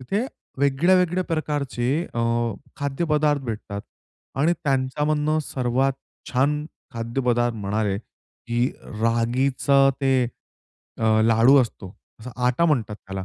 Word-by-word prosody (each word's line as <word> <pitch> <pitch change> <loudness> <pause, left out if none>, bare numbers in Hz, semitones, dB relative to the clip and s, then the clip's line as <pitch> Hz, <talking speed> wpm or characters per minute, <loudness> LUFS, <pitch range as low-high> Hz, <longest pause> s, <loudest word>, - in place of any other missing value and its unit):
तिथे 200 - -1 0.3
वेगळ्या, 140 +6 +3
वेगळ्या 180 0 +1
प्रकारचे 145 -6 -2 0.3
अ, 120 - -1 0.6
खाद्यपदार्थ 150 0 0
भेटतात 105 -4 -5 0.6
आणि 165 +4 +4
त्यांच्यामधुन 150 +3 +1
सर्वात 130 0 0 0.4
छान 145 +4 +1 0.3
खाद्यपदार्थ 120 0 0
म्हणाले, 100 0 -1
की 120 +1 -4 0.4
रागीचं 130 +4 +3
ते 135 -2 +3 0.8
अ, 110 -1 +3
लाडू 115 +5 +5
असतो. 100 -4 -8 0.3
असा 125 +3 -8 0.2
आटा 125 +7 +2
म्हणतात 120 -10 +1
त्याला 95 -2 -7
130 Hz, 105 wpm, -23 LUFS, 115-150 Hz, 0.8 s, लाडू